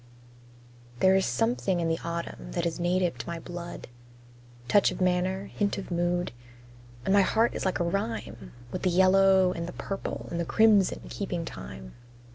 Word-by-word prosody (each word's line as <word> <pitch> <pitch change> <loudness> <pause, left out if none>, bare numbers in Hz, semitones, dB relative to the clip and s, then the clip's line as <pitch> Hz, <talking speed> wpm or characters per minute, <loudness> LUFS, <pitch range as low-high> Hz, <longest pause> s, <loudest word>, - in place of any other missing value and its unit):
There 190 0 +5
is 190 - +2
something 225 -5 0
in 165 - 0
the 165 0 0
autumn 170 - -5
that - - -1
is 170 0 -2
native 175 0 0
to - - -6
my 170 0 -4
blood 175 +1 -7 0.8
Touch 200 +9 +5
of - - -6
manner, 185 +1 +1
hint 205 0 -2
of 195 - -7
mood; 175 +1 0 0.7
And 190 - +2
my 200 - +6
heart 225 +4 +2
is - - -4
like 190 - 0
a - - +2
rhyme, 115 - -3 0.2
With - - -4
the 185 - +2
yellow 190 +1 +5
and 170 -2 -4
the 175 - -7
purple 195 0 -5
and 170 - -2
the - - +1
crimson 205 - +4
keeping - - -4
time. 65 0 -9
180 Hz, 175 wpm, -28 LUFS, 170-190 Hz, 0.8 s, my